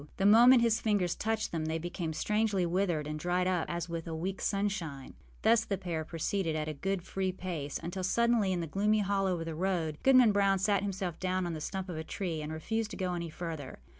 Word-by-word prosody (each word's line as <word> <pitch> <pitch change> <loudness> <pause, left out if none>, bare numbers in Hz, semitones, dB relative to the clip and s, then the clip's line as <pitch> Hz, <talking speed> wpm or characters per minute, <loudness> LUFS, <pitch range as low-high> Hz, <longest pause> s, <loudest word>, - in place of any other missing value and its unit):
The 195 - 0
moment 235 +4 +7
his 230 -1 +2
fingers 200 -5 +1
touched 220 0 -2
them 160 -2 -2
they 160 +1 -1
became 170 0 -4
strangely 210 +2 +1
withered 175 -3 0
and 155 +1 -4
dried 180 +2 0
up 180 -3 0
as 170 0 -3
with 170 -1 -5
a 165 - -4
weekâs 185 +4 -3
sunshine. 195 -9 -2 0.3
Thus 225 +1 +5
the 200 -3 -2
pair 170 -4 -3
proceeded, 165 +1 -2
at 155 -1 -2
a 155 - -2
good 190 +4 -2
free 190 0 -2
pace, 170 -6 -4
until 175 +3 -4
suddenly, 235 0 +2
in 175 -2 -1
a - - -2
gloomy 210 +6 +1
hollow 195 -3 0
of 165 - -4
the 165 - -4
road, 165 -3 -1
Goodman 255 -4 +6
Brown 200 -1 +3
sat 200 0 +2
himself 190 -4 -3
down 185 0 0
on 175 - -3
the 155 - -5
stump 190 +4 -4
of 175 -3 -5
a 160 - -3
tree 165 -2 -3
and 150 +1 -5
refused 220 +8 -2
to - - -7
go 185 -2 -1
any 170 -1 -3
farther. 160 -4 -6
185 Hz, 225 wpm, -31 LUFS, 165-200 Hz, 0.3 s, moment